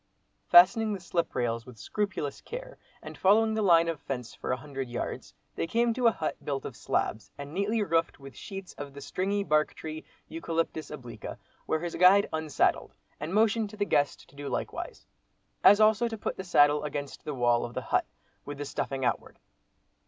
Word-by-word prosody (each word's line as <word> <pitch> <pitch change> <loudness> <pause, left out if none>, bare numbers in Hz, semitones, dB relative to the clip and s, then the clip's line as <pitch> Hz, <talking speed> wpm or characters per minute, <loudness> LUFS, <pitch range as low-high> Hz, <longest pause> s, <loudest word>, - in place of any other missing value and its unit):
Fastening 210 +5 +7
the 200 - -4
slip 170 -1 -2
rails 115 -1 -1
with 125 -2 -12
scrupulous 190 - -3
care, - - -8 0.2
and - - -8
following 220 +3 +4
the 220 - 0
line 170 -4 +5
of 165 -3 -2
fence 125 -4 -5
for - - -5
a 125 - +1
hundred 135 -2 -6
yards, 120 - -5 0.2
they - - -2
came 235 +3 +2
to 250 0 +2
a - - +6
hut 160 - -4
built 140 -2 -3
of - - -6
slabs, 110 - -2
and 145 +1 -8
neatly 210 +4 0
roofed 165 -5 0
with 135 -3 -11
sheets 195 - -8
of 140 -1 -7
the - - -7
stringy 200 +6 -1
bark 155 -3 +1
tree 155 0 -7 0.2
(Eucalyptus 165 -1 -3
obliqua) 125 -6 -8 0.3
where 160 - 0
his 175 -1 -4
guide 190 +3 +6
unsaddled, 160 -2 0 0.2
and 150 +3 -4
motioned 220 +1 +2
to 215 - -12
the 205 - +1
guest 145 -6 0
to - - -21
do 140 0 -6
likewise. - - -5 0.6
As 205 - +8
also 220 +2 +4
to 225 -1 -5
put - - -3
the 190 - -6
saddle 145 -4 +4
against 145 -1 -5
the 150 - -4
wall 120 -1 +2
of 120 - -6
the - - -2
hut, - - 0 0.4
with 145 0 -7
the 145 - -4
stuffing 135 -1 -3
outward. 120 - -2
165 Hz, 195 wpm, -29 LUFS, 140-205 Hz, 0.6 s, As